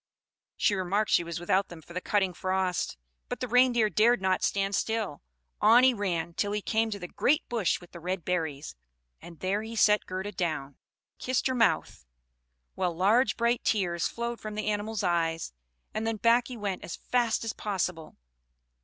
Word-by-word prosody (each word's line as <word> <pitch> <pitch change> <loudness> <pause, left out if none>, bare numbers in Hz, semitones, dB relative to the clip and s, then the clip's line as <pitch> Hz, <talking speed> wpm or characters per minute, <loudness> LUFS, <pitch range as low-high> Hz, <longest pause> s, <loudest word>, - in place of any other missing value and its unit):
She 210 - +2
remarked 200 +2 0
she - - +4
was 170 0 -5
without 185 +3 +1
them 165 -2 -11
from 170 - -13
the 180 - -3
cutting 190 -3 +1
frost; 185 - -1 0.3
but - - -4
the 250 - -3
Reindeer 245 -2 +4
dared 230 +3 +3
not 190 -1 +1
stand 195 0 0
still; 220 -7 -1 0.4
on 230 +4 +7
he 260 0 +6
ran 175 -6 -2
till 205 +4 -1
he 210 - -1
came 225 0 +1
to 205 - -4
the 180 -3 -7
great 295 - +1
bush 225 -7 +1
with 175 - -16
the 170 - -10
red 180 0 -3
berries, 160 - -2 0.5
and 170 -2 -12
there 195 +3 0
he 225 +1 -7
set 210 -1 +4
Gerda 190 +2 -4
down, 155 -7 -3 0.4
kissed 255 -1 -1
her 260 - +2
mouth, 230 - +1 0.7
while 180 -3 -1
large 210 +9 +3
bright 235 +1 +1
tears 175 -5 +1
flowed 235 0 -4
from 215 -1 -6
the 215 0 -1
animal's 210 0 -2
eyes, 165 - 0 0.4
and 220 +1 -2
then 225 -1 -1
back 235 +3 +3
he 250 - -7
went 200 -3 -3
as - - -5
fast 240 -3 0
as 225 - -2
possible. 180 -6 -3
200 Hz, 185 wpm, -28 LUFS, 175-225 Hz, 0.7 s, on